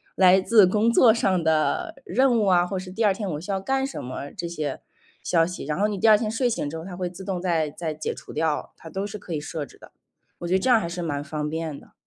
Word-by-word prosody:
来 185 0 +6
自 215 +1 +6
工 210 +5 +2
作 230 -1 +6
上 190 -6 +1
的 160 - +1
任 255 -2 +3
务 210 - +2
啊， 175 -1 +4
或 190 +1 -3
者 185 - -7
是 - - -9
第 220 +5 -2
2 200 - +4
天 200 0 -4
我 150 - -4
需 180 - -5
要 195 - 0
干 270 +5 0
什 275 - -5
么， 130 +3 -6
这 175 -4 -5
些 155 -5 -4 0.4
消 165 -2 +3
息。 180 -3 -6
然 150 +4 -2
后 210 - +3
你 205 -2 -3
第 225 - +3
2 215 - +8
天 215 0 -2
睡 245 +2 +1
醒 220 - -2
之 160 - -6
后， 160 - -8
它 180 -2 -7
会 180 -1 -3
自 185 +2 -10
动 185 -2 -3
再 165 -4 0
再 160 +1 -4
解 155 +1 -4
除 - - -11
掉。 160 -2 -1
它 165 - -11
都 190 +5 -3
是 205 0 -7
可 175 - -7
以 150 - -1
设 150 0 -5
置 - - -18
的， - - -16 0.5
我 175 - -5
觉 180 - 0
得 190 - +3
这 260 - 0
样 235 - +6
还 170 - -3
是 175 +1 -5
蛮 145 -3 -2
方 150 0 -4
便 160 -2 -4
的。 - - -20
180 Hz, 305 characters per minute, -24 LUFS, 160-210 Hz, 0.5 s, 2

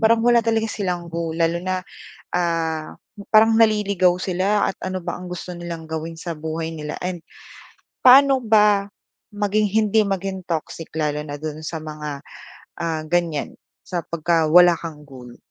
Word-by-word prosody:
parang 225 0 +3
wala 240 -1 +5
talaga 225 0 +1
silang 180 -5 -3
goal. 165 -1 -3
Lalo 170 +1 +1
na, 185 0 -3 0.5
ah, 165 -3 -1 0.4
parang 225 +1 +6
naliligaw 205 -5 +3
sila 195 +3 +1
at - - -6
ano 185 0 -3
ba 175 0 -4
ang 180 0 -9
gusto 180 0 -6
nilang 170 -2 -7
gawin 160 +1 -5
sa 170 -1 -4
buhay 160 +1 -4
nila 150 -1 -6
and 180 -2 -4 0.8
paano 270 +1 +8
ba 210 -2 +4 0.5
maging 210 +1 +1
hindi 215 0 +3
maging 190 -1 -3
toxic 165 -1 -4
lalo 150 -1 -1
na 145 -1 -6
do'n 155 0 -6
sa 160 0 -4
mga, 150 -2 -6 0.6
ah, 160 -2 -2
ganyan 170 -4 -1 0.3
sa 180 -2 -3
pagka 165 -1 +1
wala 175 +2 +7
kang 155 -3 -8
goal? 125 -4 -12
175 Hz, 155 wpm, -22 LUFS, 160-205 Hz, 0.8 s, paano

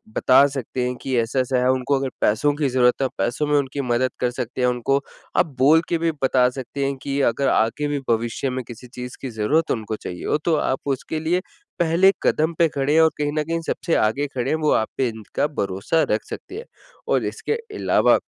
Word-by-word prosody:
बता 130 +2 +5
सकते 130 -2 -4
हैं 125 - -3
कि 130 - -2
ऐसा-ऐसा 125 +2 0
है 125 - +3
उनको 130 +2 0
अगर 135 -1 -2
पैसों 125 +8 +2
की 145 -3 0
ज़रूरत 125 0 +3
है 135 - +2
पैसों 140 +5 -1
में 150 - +2
उनकी 140 +1 -3
मदद 125 0 0
कर 125 - +1
सकते 125 0 -4
हैं, 125 - +3
उनको 125 +3 +1 0.4
आप - - +5
बोल 155 +5 +6
के 170 - +1
भी 165 0 0
बता 125 -1 +4
सकते 135 +2 -4
हैं 140 0 -1
कि 140 0 -2
अगर 140 +3 -1
आगे 130 +7 +1
भी 145 -1 -1
भविष्य 115 +3 0
में 130 0 -3
किसी 120 +1 -10
चीज़ 125 0 -8
की 135 - -4
ज़रूरत 120 +9 0
उनको 110 -1 -2
चाहिए 90 -4 -7
हो - - +2
तो 165 -2 +3
आप 130 -3 0 0.2
उसके 155 - -5
लिए 175 +3 0 0.4
पहले 170 +3 +4
कदम 160 +2 +2
पे 165 - +5
खड़े 140 +1 -1
हैं 160 - +6
और 160 - +6
कहीं 145 -1 -1
न 150 - +1
कहीं 165 +1 -2
सबसे 170 - -1
आगे 135 +7 +1
खड़े 125 +2 -1
हैं 155 - +2
वो 150 - +2
आप 110 - +1
पे 130 - +2
इनका 110 +6 -3
भरोसा 100 - -1
रख 105 - +1
सकते 375 - -8
हैं। 465 - -7 0.4
और - - +1
इसके - - -3 0.2
अलावा, - - +4
135 Hz, 225 wpm, -22 LUFS, 125-150 Hz, 0.4 s, बोल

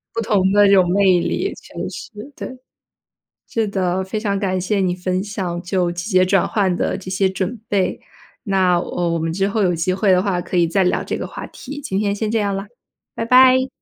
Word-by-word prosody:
不 230 - 0
同 195 -3 +2
的 205 0 +6
这 200 - +4
种 180 -2 +4
魅 190 -2 +4
力， 390 - -1
确 - - -16
实， - - -8 0.3
对。 255 - -7 0.9
是 225 -1 0
的， 190 -2 -1
非 200 +3 -4
常 200 -2 -1
感 185 -2 -1
谢 200 +3 0
你 180 -2 +1
分 185 +1 -2
享 185 -4 -4
就 180 -1 0
季 175 +5 -5
节 185 -1 +4
转 190 0 +2
换 190 -4 +1
的 185 - -1
这 185 -1 -8
些 190 0 +1
准 190 +5 -3
备， 195 -2 0 0.4
那， 190 -4 +2
呃， 175 0 -2
我 170 0 0
们 165 0 -2
之 195 +3 0
后 210 0 0
有 180 -2 +2
机 170 +3 0
会 190 0 +2
的 180 0 +4
话 195 -3 0
可 - - -9
以 170 - +4
再 190 +2 +2
聊 180 - +1
这 - - -3
个 - - -4
话 - - -8
题， 285 +3 -9
今 195 -8 -3
天 205 -1 0
先 210 +1 -2
这 225 0 +1
样 200 -1 -1
了， 195 +1 -4 0.5
拜 230 - -3
拜。 260 +1 +6
190 Hz, 245 characters per minute, -20 LUFS, 180-205 Hz, 0.9 s, 的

